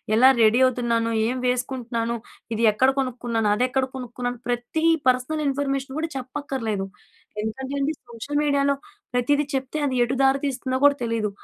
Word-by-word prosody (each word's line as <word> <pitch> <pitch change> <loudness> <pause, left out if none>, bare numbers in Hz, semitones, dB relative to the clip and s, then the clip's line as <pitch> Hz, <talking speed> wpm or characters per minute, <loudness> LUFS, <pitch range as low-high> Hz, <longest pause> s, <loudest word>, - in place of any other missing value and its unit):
ఎలా 250 +4 +7
రెడీ 225 +2 +5
అవుతున్నాను? 235 -2 +1 0.2
ఏం 255 +2 -1
వేసుకుంటున్నాను? 245 -2 -1 0.4
ఇది 225 - -1
ఎక్కడ 255 +5 +3
కొనుక్కున్నాను? 240 -4 -1
అదెక్కడ 255 +3 +1
కొనుక్కున్నాను? 245 -1 -4
ప్రతి 245 +6 -1 0.2
పర్సనల్ 255 +5 +1
ఇన్ఫర్మేషన్ 275 -1 -1
గూడా 325 +1 -2
చెప్పక్కర్లేదు. 255 -6 -3 0.5
ఎందుకంటే 260 +6 -4
అండి 280 +2 +1 0.2
సోషల్ 240 +5 -4
మీడియాలో 280 -1 +2 0.4
ప్రతీది 285 +4 +2
చెప్తే, 265 +2 -2
అది 265 -2 -1
ఎటు 245 +2 -1
దారి 270 0 +4
తీస్తుందో 260 -1 -1
కూడా 285 0 +6
తెలీదు. 230 -2 0
255 Hz, 140 wpm, -24 LUFS, 235-275 Hz, 0.5 s, ఎలా